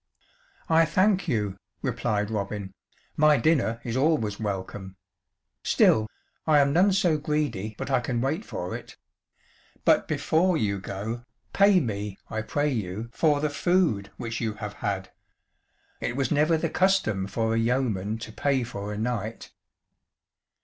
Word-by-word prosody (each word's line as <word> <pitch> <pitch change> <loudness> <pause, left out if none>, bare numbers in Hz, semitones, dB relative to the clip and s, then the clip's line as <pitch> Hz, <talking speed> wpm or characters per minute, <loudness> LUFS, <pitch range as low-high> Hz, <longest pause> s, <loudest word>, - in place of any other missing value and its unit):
"I 165 0 +5
thank 190 +3 +2
you," 105 - -1 0.3
replied 105 0 -1
Robin, 100 -2 -3 0.4
"my 150 -1 +5
dinner 135 -8 +2
is 115 -1 -3
always 130 -8 +1
welcome; 95 -2 -4 0.7
still, 110 0 +4 0.4
I 155 -1 +5
am 140 -1 +4
none 185 +5 +5
so 175 -5 +2
greedy 140 -9 -2
but - - -4
I 130 - +4
can 120 -1 -2
wait 145 - -1
for 90 - -5
it. - - -10 0.9
But - - +4
before 160 +4 +2
you 100 -7 0
go, 105 +5 -5 0.3
pay 200 -1 +6
me, 105 - -3
I 110 - -1
pray 145 +7 0
you, 110 0 -4
for 150 0 +2
the 150 -1 0
food 145 - +1
which 115 -2 -4
you 110 -2 -1
have 105 -1 -6
had. 95 -2 -3 0.9
It 120 - -2
was 135 0 -1
never 155 +2 +3
the 160 0 -2
custom 180 - +2
for 110 +2 -1
a 115 - +2
yeoman 115 -4 0
to - - -11
pay 135 +2 0
for 105 -3 -5
a 105 - -4
knight." 110 -1 -3
120 Hz, 150 wpm, -26 LUFS, 105-150 Hz, 0.9 s, pay